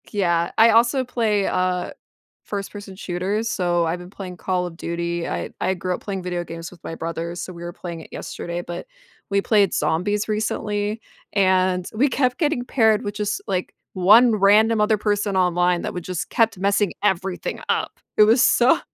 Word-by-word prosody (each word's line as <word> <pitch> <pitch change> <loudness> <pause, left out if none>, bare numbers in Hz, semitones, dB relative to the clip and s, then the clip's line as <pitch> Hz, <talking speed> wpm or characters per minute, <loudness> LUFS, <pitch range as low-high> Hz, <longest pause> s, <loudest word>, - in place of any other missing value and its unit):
Yeah, 170 -5 +1
I 225 +1 +7
also 235 +4 +4
play, 220 -5 0
uh, 180 -1 0 0.5
1st 200 -1 -5
person 205 -2 -9
shooters, 195 +4 -2
so 175 -2 +1
I've 165 +2 -2
been 180 0 -10
playing 185 -2 -8
Call 180 -1 -1
of 175 -2 -7
Duty, 170 0 -3
I - - -3
I 190 - +1
grew 185 0 -3
up - - -5
playing 195 -2 -4
video 180 -1 -2
games 165 0 -7
with 175 -2 -17
my 165 - -5
brothers, 165 +2 -4
so 185 - -6
we 170 0 -9
were 175 - -5
playing 170 -2 -7
it - - -13
yesterday, 175 0 -5
but 175 - -7 0.4
we 200 0 +2
played 205 -3 +3
Zombies 205 +6 0
recently, 210 0 -2 0.3
and 185 -2 +2
we 265 +7 +2
kept 255 -1 +1
getting 295 -7 0
paired 220 -5 +3
with 205 - -3
just, 210 0 -2
like, 185 -2 -2 0.2
1 215 +6 +6
random 215 +2 +4
other 210 0 +3
person 205 -1 0
online 180 -1 +2
that - - -3
would 180 - -5
just 180 -1 -4
kept 225 -3 +2
messing 200 +1 +1
everything 190 -2 -1
up, - - -1 0.2
it 215 - +8
was 230 +4 +5
so 255 +7 +4
195 Hz, 185 wpm, -22 LUFS, 175-215 Hz, 0.5 s, it